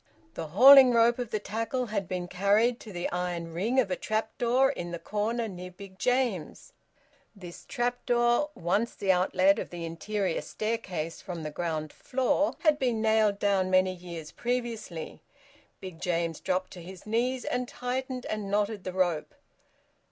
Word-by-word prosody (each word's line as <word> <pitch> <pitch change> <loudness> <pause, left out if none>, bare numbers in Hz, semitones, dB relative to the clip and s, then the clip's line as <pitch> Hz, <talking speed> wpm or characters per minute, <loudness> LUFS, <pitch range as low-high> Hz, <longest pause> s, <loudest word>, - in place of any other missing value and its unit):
The 160 - -5
hauling 255 - +9
rope 235 +1 +4
of 245 -3 -3
the 215 - -1
tackle 230 +5 -2
had 205 -5 -3
been 180 -1 -3
carried 205 +6 +2
to 215 - -10
the 175 -2 -3
iron 175 -2 -3
ring 220 +10 +1
of 205 -7 +1
a - - +1
trap 220 +2 -2
door 255 +3 +3
in 175 -10 -5
the 170 - -4
corner 220 +5 -2
near 180 -2 -8
Big 190 +1 -13
James; 250 - -1 0.6
this 180 -4 -11
trap 245 0 -2
door, 240 +4 +3
once 200 +7 0
the 195 -2 +1
outlet 185 +1 +3
of - - -5
the 170 -1 -6
interior 185 +2 -2
staircase 185 -7 -4
from 175 -4 -6
the 155 - -4
ground 155 -2 -3
floor, 265 +4 0
had 305 -2 +3
been 245 -4 0
nailed 220 -2 +3
down 200 -2 +1
many 185 0 +3
years 170 -4 -8
previously. 235 -9 -4 0.6
Big 185 -4 -9
James 170 -2 -1
dropped 185 0 -1
to 180 - -9
his 185 +2 -11
knees 245 +4 0
and 250 0 -1
tightened 255 +1 -4
and 210 -2 -4
knotted 205 0 0
the 185 - -5
rope. 175 -5 0
200 Hz, 165 wpm, -28 LUFS, 180-240 Hz, 0.6 s, hauling